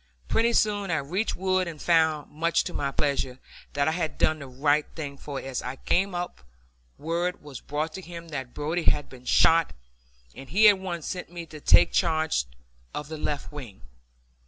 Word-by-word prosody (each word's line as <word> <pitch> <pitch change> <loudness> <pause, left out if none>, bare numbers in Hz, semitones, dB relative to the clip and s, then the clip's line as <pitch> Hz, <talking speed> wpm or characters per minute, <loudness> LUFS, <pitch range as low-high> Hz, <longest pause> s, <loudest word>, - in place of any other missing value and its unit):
Pretty 230 +1 +3
soon 205 -3 +2
I 165 - +2
reached 175 +10 -1
Wood 185 0 +1
and 160 -3 -7
found, 160 -3 +2
much 165 +2 +1
to 175 - -6
my 140 - -1
pleasure, 135 -3 -1 0.4
that 140 0 +1
I - - +3
had 160 -1 -2
done 155 0 +2
the 140 - -8
right 145 +3 +1
thing, 145 -3 -5
for 140 0 -6
as 135 -1 -4
I 125 - -5
came 190 +7 0
up 175 - -4 0.6
word 170 +3 -2
was 145 -4 -9
brought 155 +2 -3
to 190 - -6
him 170 -1 -9
that 130 -5 -6
Brodie 160 +3 -2
had 145 - -1
been 125 -1 -13
shot, 165 +4 +4 0.6
and 135 - -11
he 215 +4 +6
at 205 -2 +6
once 175 -4 -4
sent 180 - -4
me 170 -1 -7
to 155 -1 -11
take 85 - +6
charge 160 - +2 0.5
of 150 0 -5
the 160 - -5
left 145 -1 -3
wing. 125 - -9
155 Hz, 190 wpm, -27 LUFS, 140-175 Hz, 0.6 s, he